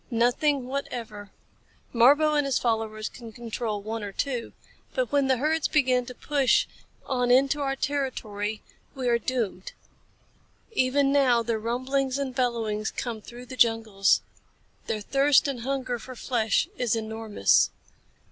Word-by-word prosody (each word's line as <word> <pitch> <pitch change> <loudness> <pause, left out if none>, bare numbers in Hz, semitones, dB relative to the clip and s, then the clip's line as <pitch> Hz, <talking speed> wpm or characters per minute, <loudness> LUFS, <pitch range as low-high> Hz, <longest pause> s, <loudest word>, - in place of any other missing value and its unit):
"Nothing 250 +3 +1
whatever. 235 -6 -5 0.6
Marbo 290 +6 +5
and 295 -1 +3
his 270 - +1
followers 220 -2 -1
can 230 -2 -10
control 220 -2 -4
one 220 +1 -4
or 200 - -5
two, 245 +2 -3 0.4
but - - 0
when 280 -2 +2
the 260 -1 +3
herds 310 +4 +1
begin 255 -4 +2
to 250 - -8
push 280 -2 +2 0.4
on 250 -2 0
into 275 +3 +4
our 270 -1 0
territory, 220 -7 -3 0.3
we 260 -2 -3
are 235 -1 +3
doomed. 225 -6 -3 1.0
Even 275 -5 +2
now 255 -4 +4
their 230 -1 -1
rumblings 260 +4 -1
and 275 -2 -3
bellowings 230 -4 -1
come 230 -3 -5
through 240 +3 -11
the 255 - -9
jungles. 225 -5 +3 0.7
Their 215 - -2
thirst 275 +5 +3
and 270 -3 -3
hunger 260 -1 -2
for 255 +3 -10
flesh 230 +2 0
is 240 -2 +1
enormous." 220 - +2
245 Hz, 140 wpm, -26 LUFS, 225-275 Hz, 1.0 s, Marbo